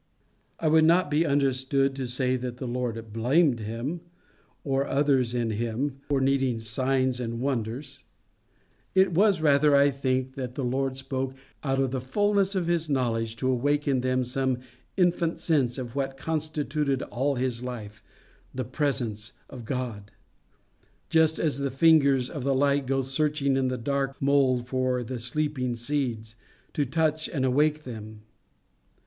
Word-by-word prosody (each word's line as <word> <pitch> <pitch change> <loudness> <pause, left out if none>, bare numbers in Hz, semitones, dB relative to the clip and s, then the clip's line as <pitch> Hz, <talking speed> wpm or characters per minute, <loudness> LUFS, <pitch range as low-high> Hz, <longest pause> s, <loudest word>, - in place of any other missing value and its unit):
I 160 - 0
would 160 +1 +5
not 170 -1 +3
be 155 +3 +2
understood 135 -1 +1
to 135 -2 -3
say 125 +1 0
that 125 -1 -4
the 130 - -5
Lord 115 -3 -4
blamed 125 +3 +3
him, 115 +10 -4 0.6
or 135 -1 +1
others 135 -4 +2
in 120 -2 0
him, 120 +5 -2
for 140 -2 +2
needing 135 -3 +1
signs 130 +3 0
and 115 -1 -3
wonders: 130 +2 -3 0.9
it 190 -1 +5
was 195 -1 +3
rather, 145 -1 +4
I 140 0 +5
think, 130 -1 -1
that 125 -2 -5
the 140 - -3
Lord 130 +1 -1
spoke 135 0 -3 0.3
out 135 -2 0
of 135 -2 +1
the 130 -1 -2
fulness 200 +8 +1
of 185 -2 0
his 165 -2 0
knowledge 115 -4 0
to 130 +3 0
awake 145 +4 0
in 135 -3 +2
them 130 0 +1
some 130 +1 -1 0.4
infant 175 -2 +2
sense 140 -7 +1
of 125 -3 -5
what 135 -1 -2
constituted 150 -2 -1
all 135 +3 -1
his 125 -2 -1
life 110 -4 -7 0.5
the 130 - -2
presence 125 -6 -2 0.2
of 125 -3 -9
God; 115 -5 -4 1.0
just 160 -1 +4
as 145 -4 0
the 140 0 -1
fingers 140 -3 +4
of 140 -1 -6
the 135 0 +1
light 140 0 +2
go 135 0 +1
searching 140 +1 0
in 135 -1 +1
the 130 0 -1
dark 135 +2 -2
mould 135 -3 +2
for 130 -1 0
the 125 +1 -5
sleeping 125 0 -1
seeds, 120 -3 -2 0.4
to 145 - 0
touch 155 +2 0
and 135 -5 -1
awake 150 +4 +2
them. 110 -4 -9
135 Hz, 155 wpm, -27 LUFS, 125-145 Hz, 1.0 s, would